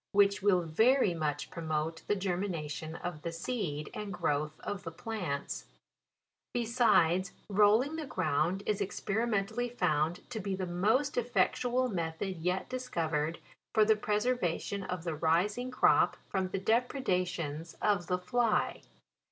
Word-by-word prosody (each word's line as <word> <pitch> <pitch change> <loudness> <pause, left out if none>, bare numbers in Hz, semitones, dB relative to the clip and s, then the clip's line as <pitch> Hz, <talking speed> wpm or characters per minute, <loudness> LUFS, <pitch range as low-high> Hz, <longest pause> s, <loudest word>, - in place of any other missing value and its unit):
which 200 0 +4
will 190 -3 +4
very 220 - +3
much 150 -3 -2
promote 160 0 -2
the 205 - +2
germina 190 0 -1
158 165 - -2
JULY. 150 - -5
tion 155 +2 -5
of 175 -3 -5
the 170 - -3
seed, 165 -5 -3
and 210 -1 -5
growth 155 -3 -1
of 205 -1 -4
the 165 - -5
plants* 170 -5 -4 0.9
Besides, 220 -7 +3 0.2
rolling 215 +9 +4
the 310 -3 -4
ground 175 - 0
is 210 -2 0
experimentally 220 +3 -1
found 170 -6 0
to 225 - -3
be 195 -1 -2
the 185 0 -3
most 220 - +1
effectual 245 +1 +1
method 180 -1 -3
yet 180 +3 -1
discovered 165 -11 -1 0.4
for 215 -1 +6
the 220 0 +5
preservation 210 -3 0
of 180 -3 -4
the 165 -2 -2
rising 180 +11 +1
crop 255 - +4
from 190 -1 0
the 185 - -3
depredations 185 - -1
of 200 -5 +1
the 180 - +1
fly. 230 +4 +1
190 Hz, 145 wpm, -31 LUFS, 165-220 Hz, 0.9 s, for